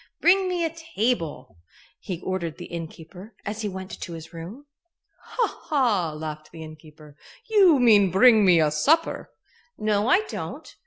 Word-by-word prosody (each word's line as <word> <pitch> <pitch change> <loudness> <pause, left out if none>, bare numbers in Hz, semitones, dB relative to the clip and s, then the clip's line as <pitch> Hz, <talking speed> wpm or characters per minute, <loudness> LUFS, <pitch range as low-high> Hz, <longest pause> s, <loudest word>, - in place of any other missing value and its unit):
"Bring 375 +2 +3
me 350 -2 -1
a 325 - -3
table," 240 - -3 0.4
he 180 -3 -6
ordered 175 -4 -4
the 175 - -8
innkeeper, 170 +5 -9
as 210 +2 -4
he 210 - -2
went 190 0 -8
to 170 - -6
his 165 0 -10
room. 185 - -9 0.6
"Ha! - - -2
ha!" 230 - +1
laughed 155 0 -7
the 160 -1 -10
innkeeper. 155 -1 -14 0.3
"You 390 - +5
mean 215 -6 +5
bring 215 +4 +5
me 180 -3 +5
a 155 -1 +2
supper." 305 - +1 0.5
"No, 210 0 0
I 370 +10 +4
don't. 430 - -8
195 Hz, 155 wpm, -24 LUFS, 165-260 Hz, 0.6 s, You